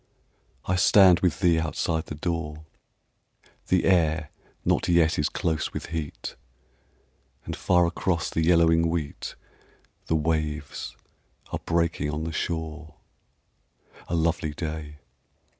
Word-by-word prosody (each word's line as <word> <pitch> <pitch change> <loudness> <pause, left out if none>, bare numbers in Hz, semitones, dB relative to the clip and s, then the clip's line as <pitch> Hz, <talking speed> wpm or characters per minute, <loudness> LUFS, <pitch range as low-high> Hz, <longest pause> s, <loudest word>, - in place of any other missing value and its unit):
I 90 - +1
stand 95 -2 +6
with 90 -1 0
thee 85 -3 +4
outside 80 0 -1
the 75 - -5
door, 80 -1 -3 1.0
The 90 - +2
air 80 -4 +2 0.3
not - - +2
yet 85 -3 +3
is 75 - +1
close 80 -2 -2
with - - -4
heat, 80 -3 -5 1.1
And - - -4
far 90 -1 +3
across 85 0 -1
the 80 - 0
yellowing 85 0 +4
wheat 80 -4 -4 0.7
The 80 - +1
waves 75 -2 -2 0.6
are - - -2
breaking 85 -3 +1
on 75 +2 -3
the 80 - -3
shore. 80 -1 -4 1.1
A 85 - -1
lovely 80 -2 0
day! 75 -2 -5
80 Hz, 120 wpm, -26 LUFS, 75-85 Hz, 1.1 s, stand